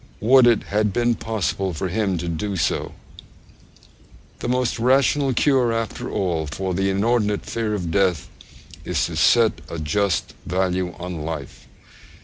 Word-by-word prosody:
Would 125 +3 +6
it 115 -3 +3
had 105 0 0
been 120 +3 +1
possible 100 -5 -2
for 95 - -2
him 95 -1 0
to 85 +1 -4
do 95 +5 -3
so! 80 - -1 1.5
The - - -4
most 125 -1 0
rational 135 +3 +3
cure 130 -2 +2
after 115 -2 -3
all 85 -6 -1
for 95 +5 -3
the 95 +2 0
inordinate 105 +1 +1
fear 110 -2 -2
of 90 -5 -3
death 95 -4 +1 0.6
is - - 0
to - - -5
set 115 -7 +3
a 85 - -5
just 80 +3 -1
value 90 0 -1
on 90 -2 -6
life. 80 -3 -7
100 Hz, 145 wpm, -22 LUFS, 90-115 Hz, 1.5 s, Would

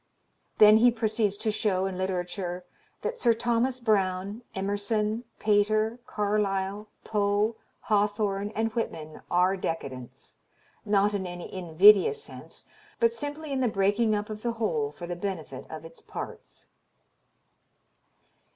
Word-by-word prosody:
Then 215 0 +8
he 240 +2 +6
proceeds 220 -3 0
to 215 - -1
show 195 -3 0
in 190 -1 -3
literature 180 -1 -3 0.4
that 480 +1 -3
Sir 230 -1 +4
Thomas 240 +2 0
Browne, 200 -1 0
Emerson, 210 +3 -1
Pater, 215 +2 +2
Carlyle, 205 -1 -1 0.2
Poe, 210 +1 +1 0.3
Hawthorne 205 -1 0
and 225 0 0
Whitman 155 -9 -4
are 180 +2 +3
decadents 135 -9 -6 0.5
not 205 0 +3
in 190 -2 -2
any 175 0 -8
invidious 190 - +5
sense - - -12 0.3
but 230 -1 +3
simply 290 +4 -6
in 270 - 0
"the 250 - +3
breaking 210 +2 +2
up 210 +1 -3
of 210 0 -6
the 235 0 -1
whole 430 - -1
for 175 - -8
the 175 0 -4
benefit 175 -8 -5
of 160 0 -8
its 165 0 -13
parts." - - -9
205 Hz, 130 wpm, -27 LUFS, 190-225 Hz, 0.5 s, Then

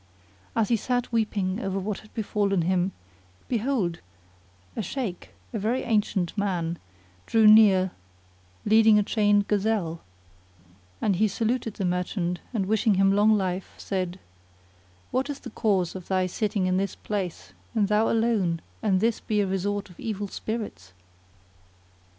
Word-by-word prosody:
As 225 -2 +1
he 235 - +3
sat 245 +3 -1
weeping 210 -4 0
over 195 -1 -2
what 195 +1 -3
had 215 - -17
befallen 200 -4 0
him, 185 +2 +1 0.6
behold, 225 -8 0 0.8
a - - -2
Shaykh,[FN#42] 210 -2 -4 0.3
a 220 - -1
very 230 +6 0
ancient 205 -6 0
man, 175 -5 -1 0.5
drew 225 -1 +4
near 205 -4 +7 0.7
leading 220 0 +6
a 210 - +4
chained 205 -1 +2
gazelle; 200 -5 0 1.0
and 195 -4 +1
he 215 +3 +3
saluted 225 +2 -1
that 195 - -2
merchant 180 0 -1
and 215 -6 -1
wishing 215 0 +2
him 195 +1 +4
long 210 +2 +4
life 185 -1 -3
said, 185 -2 -3 0.9
"What 260 +3 0
is 285 -1 -5
the - - -8
cause 195 -6 +1
of 185 -2 -8
thy 185 -1 +1
sitting 200 +1 -1
in 185 0 +1
this 195 +1 -1
place 195 -5 -4 0.2
and 210 -3 +3
thou 210 +2 +2
alone 215 -8 +1 0.2
and 195 -4 +2
this 230 0 +1
be 210 -1 -1
a 205 - +3
resort 195 +2 -2
of 175 - -18
evil 205 -2 -3
spirits?" 210 - -5
205 Hz, 145 wpm, -26 LUFS, 185-220 Hz, 1.0 s, near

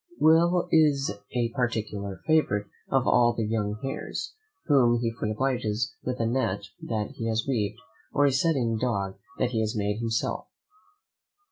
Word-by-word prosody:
Will 170 +3 +4
is 150 -4 +4 0.2
a 120 -1 +1
particular 110 -5 -3
favourite 155 -11 +2 0.2
of 135 -2 +2
all 120 0 +5
the 115 -2 -1
young 105 -1 -1
heirs, 135 - -4 0.3
whom 125 -6 +4
he 115 -1 0
frequently 110 -2 -3
obliges 120 -3 -1
with 125 0 -3
a 115 - +1
net 115 -5 0 0.2
that 110 -2 -2
he 115 - -2
has 110 0 0
weaved, 110 -5 0 0.3
or 145 - +3
a 140 - +4
setting 130 -6 +1
dog 100 -6 -1 0.2
that 125 -1 0
he 115 - 0
has 110 0 -1
made 105 +1 -1
himself. 115 -1 -1
115 Hz, 155 wpm, -27 LUFS, 110-135 Hz, 0.3 s, all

